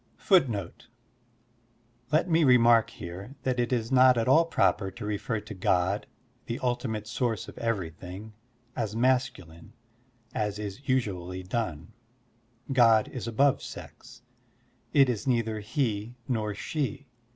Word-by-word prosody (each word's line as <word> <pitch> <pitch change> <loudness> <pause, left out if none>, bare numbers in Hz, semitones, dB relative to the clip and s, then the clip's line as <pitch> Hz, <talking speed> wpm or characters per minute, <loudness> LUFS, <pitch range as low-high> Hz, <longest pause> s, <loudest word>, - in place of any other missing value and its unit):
God's 180 -8 +6 1.6
^Let 155 +2 +3
me 165 -1 +3
remark 120 -4 +5
here 95 +10 -9
that 130 -1 0
it 120 +1 0
is 115 -1 -1
not 130 -1 +6
at 115 - 0
all 160 +6 +5
proper 105 -11 +1
to 105 +2 -8
refer 105 +2 -2
to 110 +1 -9
God, 95 +1 0 0.4
the 115 - -3
ultimate 120 -4 -1
soxirce 115 0 -2
of - - -10
everything, 95 -1 -4 0.4
as 110 -1 -3
masculine 115 -8 -1 0.6
as 105 -1 -2
is 105 +2 -6
usvially 95 -7 -2
done. 105 -4 -3 0.8
God 115 -4 +5
is 125 -3 -6
above 135 +4 +2
sex. - - -11 0.7
It 135 -2 +5
is 120 -1 -2
neither 115 -3 0
"he 110 -1 -2
nor 110 -5 -1
"she. 140 +1 -3
115 Hz, 130 wpm, -28 LUFS, 105-125 Hz, 1.6 s, God's